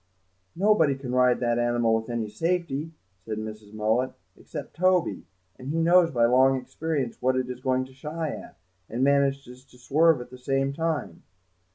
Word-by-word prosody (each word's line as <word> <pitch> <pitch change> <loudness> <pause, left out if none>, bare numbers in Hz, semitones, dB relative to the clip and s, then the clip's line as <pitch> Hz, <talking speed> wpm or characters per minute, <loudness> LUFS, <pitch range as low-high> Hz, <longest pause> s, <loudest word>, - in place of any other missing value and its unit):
"Nobody 175 -7 +3
can 135 -2 -6
ride 125 -1 +3
that 120 -1 +1
animal 120 -1 +2
with 110 +1 -1
any 115 -2 -2
safety," 165 +5 -2 0.3
said 110 +1 -5
Mrs. 110 -1 -7
Mullet, 110 +4 0 0.2
"except - - -9
Toby, 180 - +1 0.3
and 130 - -9
he 155 +3 -2
knows 170 +1 +5
by 120 -6 +2
long 130 +2 +4
experience 140 -1 -4
what 130 +1 +2
it 130 -1 -1
is 125 - -8
going 130 -1 0
to 130 - -16
shy 155 +4 -4
at, - - -9 0.3
and 120 +4 -1
manages 140 -2 +1
to 130 -2 -21
swerve 155 +4 +3
at 125 0 -9
the 125 - -11
same 135 +1 0
time." 160 0 -3
130 Hz, 175 wpm, -26 LUFS, 120-155 Hz, 0.3 s, knows